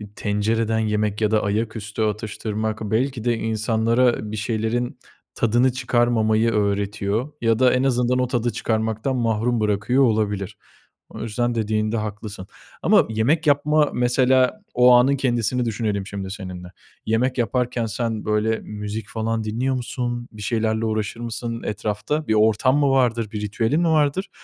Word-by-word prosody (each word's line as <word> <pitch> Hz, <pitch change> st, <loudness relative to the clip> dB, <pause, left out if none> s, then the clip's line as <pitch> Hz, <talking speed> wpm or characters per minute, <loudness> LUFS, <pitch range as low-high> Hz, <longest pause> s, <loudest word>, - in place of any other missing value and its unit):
tencereden 110 Hz, +2 st, 0 dB
yemek 105 Hz, -1 st, -1 dB
ya 110 Hz, 0 st, +2 dB
da 110 Hz, -1 st, +2 dB
ayaküstü 110 Hz, +1 st, -3 dB
atıştırmak 110 Hz, 0 st, -3 dB
belki 115 Hz, +3 st, -1 dB
de 120 Hz, -1 st, +1 dB
insanlara 110 Hz, +1 st, +1 dB
bir 110 Hz, -, -4 dB
şeylerin 110 Hz, +3 st, -2 dB, 0.4 s
tadını 120 Hz, +3 st, +2 dB
çıkarmamayı 120 Hz, -3 st, +2 dB
öğretiyor 105 Hz, +4 st, -1 dB
ya 115 Hz, -1 st, +2 dB
da 130 Hz, -1 st, +5 dB
en 125 Hz, +1 st, +1 dB
azından 125 Hz, -1 st, +1 dB
o 125 Hz, -, +1 dB
tadı 120 Hz, -1 st, 0 dB
çıkarmaktan 110 Hz, +4 st, -1 dB
mahrum 115 Hz, 0 st, 0 dB
bırakıyor 105 Hz, +5 st, +2 dB
olabilir. 105 Hz, -5 st, 0 dB, 0.5 s
O -, -, -9 dB
yüzden 120 Hz, +2 st, -1 dB
dediğinde 110 Hz, 0 st, 0 dB
haklısın. 105 Hz, -2 st, -6 dB, 0.3 s
Ama -, -, +4 dB
yemek 125 Hz, +9 st, +1 dB
yapma 150 Hz, +1 st, +3 dB
mesela 130 Hz, +7 st, +2 dB
o 125 Hz, 0 st, +6 dB
anın 130 Hz, +3 st, +4 dB
kendisini 125 Hz, -2 st, 0 dB
düşünelim 105 Hz, -3 st, -2 dB
şimdi 100 Hz, -2 st, -5 dB
seninle. 90 Hz, -3 st, -7 dB, 0.4 s
Yemek 125 Hz, +4 st, 0 dB
yaparken 120 Hz, +1 st, 0 dB
sen 110 Hz, 0 st, -3 dB
böyle 110 Hz, +1 st, +1 dB
müzik 105 Hz, 0 st, -6 dB
falan 110 Hz, 0 st, -2 dB
dinliyor 120 Hz, +5 st, -1 dB
musun, 120 Hz, -1 st, -3 dB
bir 105 Hz, -, -11 dB
şeylerle 110 Hz, 0 st, 0 dB
uğraşır 110 Hz, 0 st, -2 dB
mısın 115 Hz, 0 st, -4 dB
etrafta? 105 Hz, +8 st, -2 dB
Bir 110 Hz, -, +2 dB
ortam 110 Hz, +5 st, +3 dB
mı 145 Hz, -1 st, +3 dB
vardır, 120 Hz, -5 st, +1 dB
bir 105 Hz, -, -4 dB
ritüelin 115 Hz, +9 st, 0 dB
mi 170 Hz, -, +2 dB
vardır 155 Hz, +3 st, +1 dB
115 Hz, 145 wpm, -22 LUFS, 105-125 Hz, 0.5 s, o